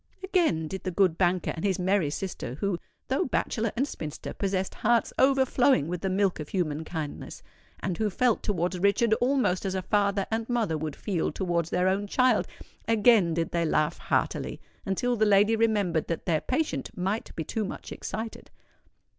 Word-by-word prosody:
Again 335 - +1
did 190 +3 -5
the - - -3
good 185 -2 +2
banker 180 0 +1
and 160 - -6
his 195 -3 +1
merry 185 -3 +1
sister—who, 175 +1 -3 0.3
though 265 - +1
bachelor 230 -4 -1
and 265 +4 +1
spinster, 155 - -6
possessed 190 -1 -1
hearts 235 +1 +1
overflowing 265 - +4
with 175 0 -4
the 190 - -1
milk 190 -1 +1
of 150 - -6
human 160 -5 -1
kindness, 160 -3 -6 0.4
and 185 -1 -2
who 215 -1 +1
felt 235 +3 +1
towards 180 -2 -1
Richard 200 +4 +3
almost 250 -8 +2
as 190 -1 -2
a 190 - -2
father 200 -1 +1
and 225 +1 -2
mother 230 -9 +1
would 155 -1 -4
feel 185 -6 -1
towards 170 -3 -1
their 180 +1 +1
own 195 +2 0
child,—again 225 -5 +2
did 165 -1 -1
they 170 -1 +1
laugh 155 0 +1
heartily; - - -1 0.3
until 245 +6 0
the 220 - +1
lady 210 +1 +5
remembered 205 -8 +1
that 165 - -3
their 160 -4 +1
patient 300 +4 -1
might 195 +5 -2
be 160 - -3
too 220 +8 -2
much 195 - -7
excited. 220 +1 -6
195 Hz, 170 wpm, -27 LUFS, 170-225 Hz, 0.4 s, lady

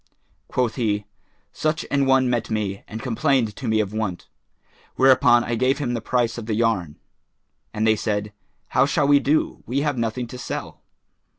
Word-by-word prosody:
Quoth 125 -1 -1
he, 105 -4 0 0.5
"Such 155 0 -1
an 140 -1 +2
one 135 -1 +4
met 120 -2 -1
me 105 -3 -2
and 110 +1 -7
complained 125 -3 +1
to 130 - -6
me 110 -1 +2
of 105 -1 -1
want; 110 -5 -3 0.7
whereupon 130 -2 +5
I 120 - -3
gave 130 +4 +2
him 130 -5 -2
the 115 - -2
price 120 0 0
of 110 - -8
the 110 - 0
yarn." 105 -9 0 0.8
And 110 +1 -1
they 110 0 +4
said, 105 -1 -2 0.4
"How - - +3
shall 145 0 +1
we 145 0 +6
do? 145 +3 0
We 135 +4 0
have 145 -4 -1
nothing 115 +2 -2
to 125 - -8
sell." - - -6
120 Hz, 180 wpm, -23 LUFS, 110-135 Hz, 0.8 s, we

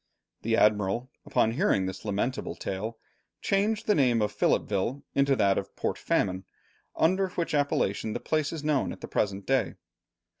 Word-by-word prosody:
The 115 0 +1
Admiral, 105 +4 +2 0.2
upon 110 - +2
hearing 120 - +2
this 95 0 -5
lamentable 105 +5 -2
tale, 110 +4 -4 0.4
changed 210 +2 0
the 210 - +4
name 125 - +3
of 105 - -2
Philippeville 105 +7 0
into 140 0 +3
that 100 -5 +3
of - - -9
Port - - -1
Famine, 95 -1 0 0.5
under 190 +3 +2
which 175 -2 -3
appellation 110 -7 0
the - - -3
place 155 -2 0
is 160 -3 -5
known 150 -3 +1
at - - -9
the - - -6
present 100 -1 -1
day. 130 -6 +1
120 Hz, 160 wpm, -28 LUFS, 100-150 Hz, 0.5 s, the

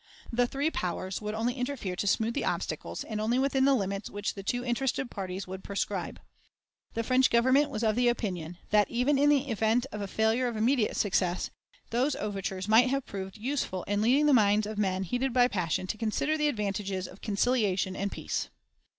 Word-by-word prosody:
The 245 +1 +3
three 285 +5 -1
powers 185 - -3
would 210 0 -3
only 230 +3 0
interfere 250 -7 -3
to 205 - -1
smooth 220 +3 +1
the 285 - -1
obstacles, - - -3
and 215 -1 -4
only 230 +3 +1
within 270 0 +2
the 275 0 +5
limits 195 -2 -2
which 205 0 -3
the 200 - -7
two 245 +5 -2
interested 250 +1 -1
parties 190 0 -5
would 190 +1 -7
prescribe. 200 0 -3 0.8
The 230 - 0
French 255 +2 +4
Government 260 +5 +4
was 215 - -3
of 215 -1 +2
the 245 0 +3
opinion 180 -8 -2
that, 210 -1 +4
even 255 +4 +2
in 290 +1 +5
the 285 -1 +3
event 225 +3 +2
of 210 - -5
a 200 - -3
failure 220 +5 +1
of 235 -2 -3
immediate 230 +1 +2
success, 185 -3 0 0.4
those 255 +5 +1
overtures 195 -2 -3
might 230 +4 +6
have 275 0 -1
proved 190 -1 -6
useful 225 -6 -2
in 205 0 -1
leading 260 +7 +4
the 295 - +5
minds 210 -2 +4
of 215 0 -5
men 190 -2 0
heated 245 +7 -1
by 245 -1 +5
passion 185 -5 -1
to 210 +3 -4
consider 230 +7 0
the 300 -1 +1
advantages 200 -6 -2
of 185 - -14
conciliation 200 -3 +1
and 200 +1 -2
peace. - - -3
220 Hz, 200 wpm, -29 LUFS, 200-250 Hz, 0.8 s, might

